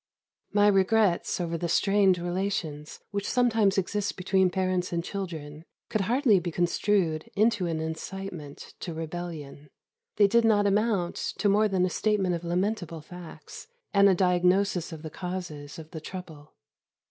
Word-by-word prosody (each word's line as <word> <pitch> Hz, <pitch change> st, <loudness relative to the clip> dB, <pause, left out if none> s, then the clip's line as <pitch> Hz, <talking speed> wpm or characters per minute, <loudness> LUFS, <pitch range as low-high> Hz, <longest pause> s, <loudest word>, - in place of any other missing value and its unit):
My 205 Hz, 0 st, +4 dB
regrets 195 Hz, -2 st, +2 dB
over 170 Hz, -1 st, -2 dB
the 170 Hz, -, -2 dB
strained 195 Hz, 0 st, +3 dB
relations 175 Hz, -4 st, -3 dB
which 200 Hz, 0 st, -2 dB
sometimes 225 Hz, -6 st, +2 dB
exist 200 Hz, +2 st, -1 dB
between 190 Hz, 0 st, +2 dB
parents 185 Hz, 0 st, -1 dB
and 170 Hz, -1 st, -1 dB
children 160 Hz, -6 st, -6 dB, 0.3 s
could 215 Hz, -, 0 dB
hardly 230 Hz, 0 st, +3 dB
be 175 Hz, 0 st, -4 dB
construed 175 Hz, +1 st, 0 dB
into 210 Hz, -3 st, +2 dB
an 165 Hz, -1 st, -2 dB
incitement 160 Hz, -1 st, -6 dB
to 170 Hz, -3 st, -5 dB
rebellion. 160 Hz, -3 st, -6 dB, 0.5 s
They 205 Hz, -, +5 dB
did 235 Hz, +4 st, +4 dB
not 210 Hz, -2 st, +4 dB
amount 200 Hz, -3 st, +1 dB, 0.2 s
to 210 Hz, -, +1 dB
more 210 Hz, +2 st, +4 dB
than 190 Hz, -3 st, +1 dB
a -, -, 0 dB
statement 205 Hz, -4 st, +1 dB
of 170 Hz, 0 st, -3 dB
lamentable 175 Hz, -1 st, -2 dB
facts, 180 Hz, -, -11 dB, 0.3 s
and 200 Hz, -1 st, +6 dB
a 190 Hz, -, +4 dB
diagnosis 180 Hz, 0 st, +2 dB
of 160 Hz, -1 st, -8 dB
the 155 Hz, -, -6 dB
causes 175 Hz, -6 st, -6 dB
of 160 Hz, -1 st, -11 dB
the 160 Hz, -, -7 dB
trouble. 160 Hz, -4 st, -9 dB
185 Hz, 150 wpm, -27 LUFS, 165-200 Hz, 0.5 s, and